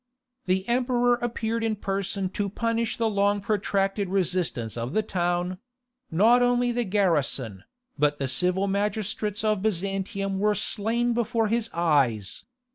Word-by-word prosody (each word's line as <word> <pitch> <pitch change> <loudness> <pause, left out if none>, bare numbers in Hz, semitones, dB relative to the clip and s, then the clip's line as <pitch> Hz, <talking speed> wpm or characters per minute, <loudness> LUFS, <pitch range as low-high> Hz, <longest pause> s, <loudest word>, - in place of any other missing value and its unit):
The 190 +1 0
emperor 245 0 +2
appeared 230 -1 -2
in 225 -1 0
person 195 -1 -2
to 200 +1 -2
punish 230 +2 -1
the 230 - +1
long 205 -1 +2
protracted 200 -1 0
resistance 180 - -1
of 120 +4 -4
the 215 - +2
town; 180 -1 -1 0.5
not 225 +9 +4
only 245 0 +2
the 240 0 -1
garrison, 145 - 0 0.3
but 145 0 +2
the 135 - -2
civil 180 +8 +2
magistrates 210 +1 -1
of 215 -2 +1
Byzantium 195 0 -2
were 210 +1 +2
slain 230 +5 0
before 230 -1 0
his 230 0 0
eyes. 135 - +1
200 Hz, 135 wpm, -26 LUFS, 180-225 Hz, 0.5 s, not